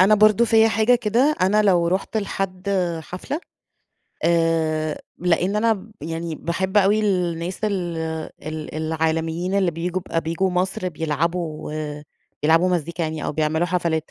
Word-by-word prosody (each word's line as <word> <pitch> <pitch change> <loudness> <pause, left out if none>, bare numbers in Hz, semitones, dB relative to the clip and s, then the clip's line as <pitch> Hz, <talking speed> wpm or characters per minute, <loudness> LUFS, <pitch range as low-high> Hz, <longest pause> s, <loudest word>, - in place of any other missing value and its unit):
أنا 195 +3 +7
برضو 215 +2 +5
فيّا 225 -1 +5
حاجة 220 +3 +3
كده، 245 +6 +2
أنا 205 +3 +4
لو 175 -4 +3
رُحت 190 +5 -1
لحد 195 -2 -3 0.3
حفلة 185 - -5 0.8
آآ 160 -2 +1 0.2
لإن 180 +3 +1
أنا 220 -1 0
يعني 165 +1 -4
باحب 190 +5 -2
أوي 205 +1 +5
الناس 180 -2 -1
ال 180 -5 -1 0.5
ال 155 0 -6
العالميين 160 +3 -1
اللي 195 -3 +3
بييجوا 175 +3 -3 0.2
بييجوا 165 +4 0
مصر 185 0 -1
بيلعبوا 160 0 -2 0.7
بيلعبوا 165 +4 +4
مزيكا 170 -1 -1
يعني 155 -1 -3
أو - - -2
بيعملوا 160 +2 +1
حفلات، 165 -3 -1
175 Hz, 130 wpm, -22 LUFS, 160-200 Hz, 0.8 s, أنا